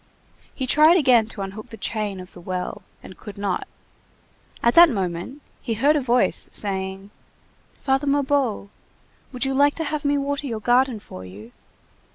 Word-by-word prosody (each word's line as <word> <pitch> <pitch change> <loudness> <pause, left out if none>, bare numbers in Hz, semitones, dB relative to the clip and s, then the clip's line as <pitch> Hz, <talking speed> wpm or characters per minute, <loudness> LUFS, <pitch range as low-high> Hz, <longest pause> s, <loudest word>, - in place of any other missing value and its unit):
He 265 - -3
tried 310 +6 +5
again 250 -8 +4
to 205 -3 -6
unhook 195 +3 -8
the 225 - -9
chain 210 -2 -3
of 180 0 -11
the 175 - -12
well, 185 +3 -5 0.2
and 185 - -11
could 205 -2 -10
not. 200 -2 -2 1.0
At 235 - +4
that 340 0 +8
moment, 190 - -4 0.2
he 230 -3 -3
heard 285 +7 +3
a 295 - +1
voice 250 -1 +2
saying:— 195 0 -2 0.7
"Father 270 +1 0
Mabeuf, 275 -7 0 0.6
would 255 +1 -2
you 270 - -1
like 285 +2 +3
to 325 - -3
have 305 -1 -3
me 285 0 +1
water 285 0 -2
your 225 -4 -4
garden 245 +1 +2
for 95 - -11
you?" 100 +5 -12
235 Hz, 170 wpm, -23 LUFS, 195-280 Hz, 1.0 s, that